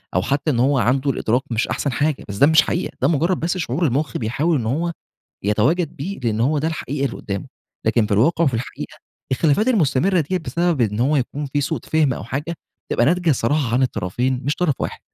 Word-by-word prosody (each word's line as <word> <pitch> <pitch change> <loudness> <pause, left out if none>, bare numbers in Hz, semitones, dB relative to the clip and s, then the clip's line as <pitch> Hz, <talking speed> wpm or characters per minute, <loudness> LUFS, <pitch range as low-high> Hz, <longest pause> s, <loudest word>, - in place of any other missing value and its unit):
أو 90 - +3
حتى 140 - 0
إن 120 - 0
هو 135 +3 +3
عنده 130 +3 +2
الإدراك 120 0 0
مش 115 +1 0
أحسن 140 - -1
حاجة، 145 +3 -1
بس 100 - -5
ده 140 - +6
مش 160 0 +6
حقيقة 175 +3 -3
ده - - +4
مجرد 170 +3 +1
بس 175 +3 -1
شعور 160 0 -1
المخ 140 -1 0
بيحاول 140 +9 0
إن 120 - -3
هو 160 +9 0 0.5
يتواجد 140 - +1
بيه، 185 +8 -5
لإن 115 -3 -1
هو 145 +6 +2
ده 155 +3 0
الحقيقي 145 -3 -3
اللي 120 - -5
قدّامه، 100 -2 -5 0.4
لكن 110 -1 +3
في 105 - -3
الواقع 160 +11 +3
وفي 135 -6 +1
الحقيقة، 115 +3 -5 0.4
الخلافات 160 - +2
المستمرة 175 - +2
ديَّة 180 +5 -1
بسبب 170 -3 -1
إن 105 -1 +1
هو 140 +5 +3
يكون 140 +2 -2
في 145 +1 -1
سوء 155 +3 -1
فهم 155 -4 +2
أو - - -7
حاجة 145 +8 -3 0.4
تبقى 120 - +2
ناتجة 175 0 +2
الصراحة 130 0 +1
عن 130 - +3
الطرفين 125 +2 -1
مش 145 - 0
طرف 170 -6 +1
واحد، - - -4
140 Hz, 215 wpm, -21 LUFS, 120-160 Hz, 0.5 s, ده